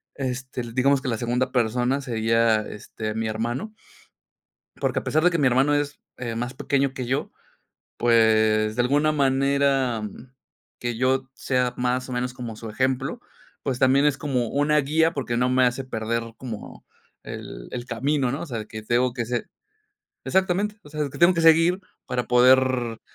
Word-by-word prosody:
este, 130 -1 -4
l 120 -1 -8
digamos 135 +1 +3
que - - -5
la 115 - -1
segunda 125 +3 -1
persona 125 +2 +1
sería, 115 -2 +2
este, 110 +1 -6
mi 110 0 -1
hermano, 120 - -3 1.0
porque - - 0
a - - -11
pesar 155 - +1
de 180 - +5
que 170 - 0
mi 140 - +3
hermano 135 +4 +3
es, 145 -1 -1 0.2
eh, 115 -2 -4
más 120 +2 -3
pequeño 135 0 0
que 130 -2 -4
yo, 135 +4 -2 0.7
pues, 110 -2 +3
de 120 - +3
alguna 145 +5 +2
manera 135 -3 +2 0.8
que 120 -1 -3
yo 130 +2 +2
t - - -33
sea 125 -1 0
más 125 +1 -1
o 130 - -6
menos 125 0 -2
como 120 -3 -7
su 110 0 -8
ejemplo, 130 - -1 0.4
pues 130 -3 -2
también 130 +2 +4
es 145 -1 +1
como 130 -6 -1
una 145 +3 +2
guía, 160 +3 +2
porque 130 -4 -2
no 125 +1 +2
me 130 0 +4
hace 125 +2 0
perder 115 -1 -3
como 115 -5 -8 0.4
el - - -8
el 120 -1 -5
camino, 130 +2 0
¿no?, 140 - -3
o - - -6
sea, 120 -7 -4
de 105 - -8
que 110 0 -7
tengo 120 +3 +1
que 120 -2 -2
ser 120 0 -3 0.8
exactamente, 190 +3 +1
o - - -14
sea, 150 -1 -2
que - - -10
tengo 175 +2 +6
que 170 - 0
seguir 165 +3 +5 0.3
para 125 -1 -2
poder 125 -1 +4
125 Hz, 180 wpm, -24 LUFS, 120-140 Hz, 1.0 s, tengo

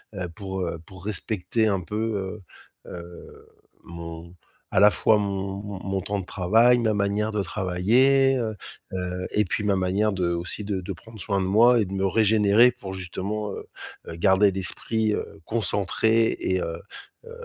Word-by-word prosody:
heu 95 - -5
heu, 90 - -3
pour, 95 +2 -6
heu, 85 -2 -3
pour 95 -1 -13
respecter 105 +1 0
un 100 -3 0
peu, 105 +1 -3 0.5
heu - - -11
heu, 85 0 -11 0.4
mon 85 0 -9 0.4
à - - +3
la 105 +1 +8
fois 110 +1 +3
mon 100 -1 -3
mon 100 -2 -7
mon 95 0 -1
temps 100 +2 -3
de 95 - -6
travail, 115 +8 +3
ma 110 -2 +1
manière 100 +1 0
de 105 -2 -1
travailler, 120 +10 +3
heu 110 -3 -2 0.4
heu, 90 0 -3
et 105 - +2
puis 100 - -2
ma 100 -1 +2
manière 95 +3 +1
de 90 -2 0
aussi 85 +4 -4
de 100 -2 -3
de 90 +2 -5
prendre 110 +5 -14
soin 100 0 0
de - - -1
moi 115 +5 +5
et 105 - +2
de 95 - -8
me 95 0 0
régénérer 110 +3 +4
pour 100 -6 -8
justement, 100 +3 -4
heu - - -8 0.4
heu, 80 - -6
garder 95 +4 +4
l'esprit, 105 +3 -1
heu, - - -5
concentré 110 +1 +1
et 95 0 0
heu, 85 0 -4 0.4
hem, 465 - -13
100 Hz, 180 wpm, -25 LUFS, 95-110 Hz, 0.5 s, la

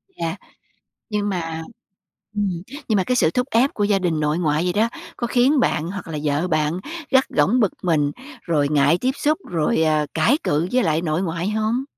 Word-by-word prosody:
Yeah, 165 +2 -3 0.8
nhưng 205 -1 -1
mà 165 -4 -3 0.7
ừm, 190 -5 -1 0.3
nhưng 220 - +2
mà 190 - +2
cái 250 - 0
sự 160 - +3
thúc 250 +5 0
ép 250 +5 +3
của 205 - -1
gia 205 -1 +2
đình 170 -4 0
nội 150 +1 0
ngoại 155 -1 +1
vậy 180 0 0
đó, 220 +3 +2 0.3
có 240 - -2
khiến 255 +4 +3
bạn 165 -9 +1
hoặc 200 -2 -7
là 160 -2 -4
vợ 150 +4 0
bạn 155 +1 0 0.3
gắt 265 0 +4
gỏng 195 +12 +2
bực 210 -6 +3
mình 150 -5 +2 0.3
rồi 150 -4 +1
ngại 145 +2 +3
tiếp 260 +1 +2
xúc, 305 +2 +1
rồi, 160 -2 +1
ờ, 155 -1 +2
cãi 275 +7 +3
cự 155 +4 +1
với 255 0 +2
lại 160 -1 +1
nội 160 0 -1
ngoại 170 +2 -2
không? 220 +4 0
175 Hz, 205 wpm, -22 LUFS, 155-220 Hz, 0.8 s, gắt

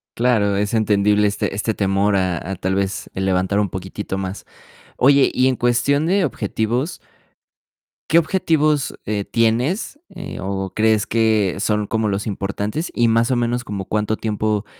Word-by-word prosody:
Claro, 110 -5 +2
es 105 +2 -1
entendible 105 -1 +3
este 100 -1 -2
este 105 +2 -1
temor 100 +1 +1
a 95 -2 +1
a - - -2
tal 95 +1 -2
vez 100 +1 -2
el 95 - -2
levantar 95 +2 +1
un 100 - 0
poquitito 95 +1 -5
más. 95 0 -5 0.5
Oye, 140 +1 +5
y 130 +1 +3
en 130 - +2
cuestión 125 +5 +1
de 190 0 +2
objetivos 120 - -2 1.1
¿qué 165 - +6
objetivos, 155 -4 +1
eh, 105 -1 -1
tienes, 120 - 0
eh, 185 0 -8
o 95 0 -3
crees 110 -1 +2
que 110 -4 +1
son 105 0 0
como 110 0 -1
los 100 +1 -2
importantes? 105 - -3
Y 120 -1 +3
más 115 +2 +2
o 130 - +2
menos, 120 +1 -1
¿como 100 -4 -5
cuánto 105 +1 -1
tiempo, 105 -1 -1
105 Hz, 160 wpm, -20 LUFS, 100-120 Hz, 1.1 s, qué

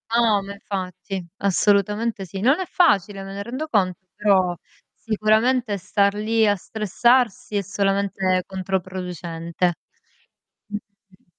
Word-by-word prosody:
No, 225 -4 +4
ma 200 +1 -7
infatti. 190 -2 -5
Assolutamente 205 +2 +1
sì. 190 +2 -7
Non 270 - +3
è 375 - -2
facile, 205 - +2
me 195 - -8
ne 200 +1 -4
rendo 260 +8 -4
conto 185 - +1 0.2
però 190 -4 +3 0.4
sicuramente 220 +1 +1
star 200 +2 +1
lì 220 +1 +2
a 205 - +4
stressarsi 230 +4 +1
è - - +1
solamente 195 -1 0
controproducente. 180 -2 -3 0.9
Mh-mh. 200 -2 -11
200 Hz, 115 wpm, -23 LUFS, 185-215 Hz, 0.9 s, No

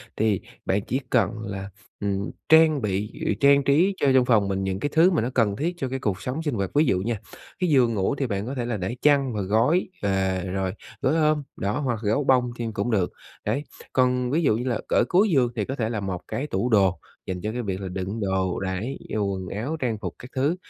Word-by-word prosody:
thì 105 -3 +1 0.2
bạn 100 +2 +1
chỉ 130 - 0
cần 115 -3 +3
là, 100 -1 -5 0.3
ừm, 100 -1 -2 0.2
trang 160 -3 +6
bị, 105 +1 -1
ừ, - - +2
trang 140 0 +5
trí 165 +9 +3
cho 140 - +1
trong 130 -1 +5
phòng 110 -5 +3
mình 95 0 -1
những 95 0 -2
cái 145 - -1
thứ 170 +4 +5
mà 165 - +2
nó 120 - -1
cần 105 -5 +2
thiết 170 +9 -1
cho 135 -6 -3
cái 135 +1 -3
cuộc 105 -5 -2
sống 140 +6 -3
sinh 145 -6 -1
hoạt. 100 -2 -1
Ví 150 +2 +5
dụ 95 -7 +2
nha, 110 +1 -2 0.4
cái 180 -2 +1
giường 125 -5 +4
ngủ 100 +6 0
thì 140 -2 -1
bạn 100 -1 -2
có 135 +3 -4
thể 120 - -2
là 120 -2 -2
để 95 +6 -3
chăn 140 -4 +3
và 105 - -2
gối, 115 - +2
và 95 -2 0
rồi 95 0 -2 0.3
gối 135 +4 +2
ôm, 155 -2 +2
đó, 100 +8 -1
hoặc 120 -6 -1
gấu 110 +8 +1
bông 125 -2 +3
thêm 115 -2 -3
cũng 120 +2 -1
được, 95 -5 +1 0.3
đấy. 145 - 0 0.3
Còn 125 -1 +2
ví 165 +3 +2
dụ 110 -6 +3
như 125 +2 -3
là 115 - 0
ở - - +4
cuối 195 +4 +4
giường 130 -7 +3
thì 105 - -1
có 135 - -4
thể 115 -4 -1
là 110 -3 -2
một 95 -2 -4
cái 145 +3 -3
tủ 125 - -1
đồ 95 -4 +3 0.3
dành 90 -1 -4
cho 105 - -2
cái 125 +2 -3
việc 100 -3 -3
là 95 - -4
đựng 95 +4 -4
đồ, 95 -2 0
đấy, 95 +8 -3
dù 105 -2 0
quần 95 -1 -5
áo, 120 - -3
trang 115 -4 -1
phục 90 -4 -5
các 125 - -10
thứ. 145 +6 +2
115 Hz, 250 wpm, -25 LUFS, 100-135 Hz, 0.4 s, trang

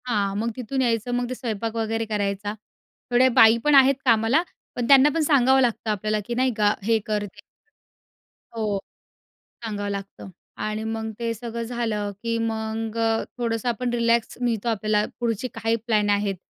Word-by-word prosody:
हां, 200 -4 0
मग 225 +3 -1
तिथून 260 +2 -2
यायचं 235 -1 0
मग 245 0 -1
ते 255 - -3
स्वयंपाक 230 -2 -4
वगैरे 225 0 -1
करायचा. 205 -1 -2 0.6
थोड्या 250 +2 +5
बाई 225 +1 +7
पण 295 -1 +4
आहेत 270 0 +6
कामाला 230 +5 +4 0.3
पण 245 -2 -2
त्यांना 275 +2 +7
पण 330 - +2
सांगावं 265 -3 +4
लागतं 235 -2 0
आपल्याला 215 +1 -1
की 240 - -4
नाही 255 0 +1
का 210 -1 +3
हे 225 +2 +2
कर 210 -1 -1
ते - - -7
कर 205 - -16 1.2
हो, 210 -2 -1 0.9
सांगावं 205 -2 -3
लागतं 200 -1 -7 0.3
आणि 215 +1 -3
मग 220 0 -3
ते 230 -1 -1
सगळं 230 +1 -5
झालं 225 -3 -2
की 230 0 -1
मग 220 0 -3
अ 225 -1 +1
थोडंसं 230 -1 -1
आपण 245 +1 -2
रिलॅक्स 235 -1 +1
मिळतो 235 -2 0
आपल्याला. 215 -1 +1
पुढची 235 0 -1
काही 225 0 0
प्लॅन 210 -2 +2
आहेत 205 -1 +1
225 Hz, 170 wpm, -24 LUFS, 215-240 Hz, 1.2 s, बाई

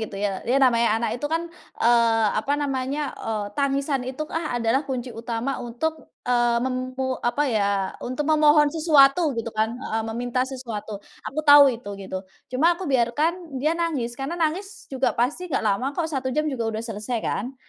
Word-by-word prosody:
gitu 205 -2 -6
ya 200 -2 -2
dia 260 +3 +2
namanya 235 -4 +3
anak 235 - -1
itu 290 +4 -4
kan, 330 +1 0 0.3
eee, 230 -2 +4
apa 285 +7 0
namanya, 275 0 -2
eee, 215 -2 -3
tangisan 280 -1 0
itu 260 +4 -5
adalah 255 -5 0
kunci 255 -3 -5
utama 235 +3 -3
untuk, 310 +7 -4 0.2
eee, 240 -1 +3
memu 255 +1 -2
apa 240 +5 +1
ya 200 -5 0
untuk 255 +4 -3
memohon 300 -1 +5
sesuatu 305 0 +4
gitu 230 0 -4
kan, 220 +3 0
eee, 225 -4 -2
meminta 245 +2 -1
sesuatu. 230 -6 -6 0.3
Aku 275 - -7
tahu 285 -2 +9
itu 235 -3 -8 0.2
gitu. 190 -1 -4 0.3
Cuma 320 +7 +3
aku 345 -5 -5
biarkan 295 +6 0
dia 305 +6 0
nangis, 270 -9 -2
karena 275 +5 -3
nangis 350 +4 -3
juga 260 -3 0
pasti 285 +10 -1
nggak 300 -6 -1
lama 215 +4 +1
kok, 320 -2 -2
1 260 -3 -2
jam 305 0 +1
juga 235 -4 -2
udah 220 0 -3
selesai 225 +1 -4
kan, 245 +7 -3
255 Hz, 175 wpm, -24 LUFS, 235-295 Hz, 0.3 s, tahu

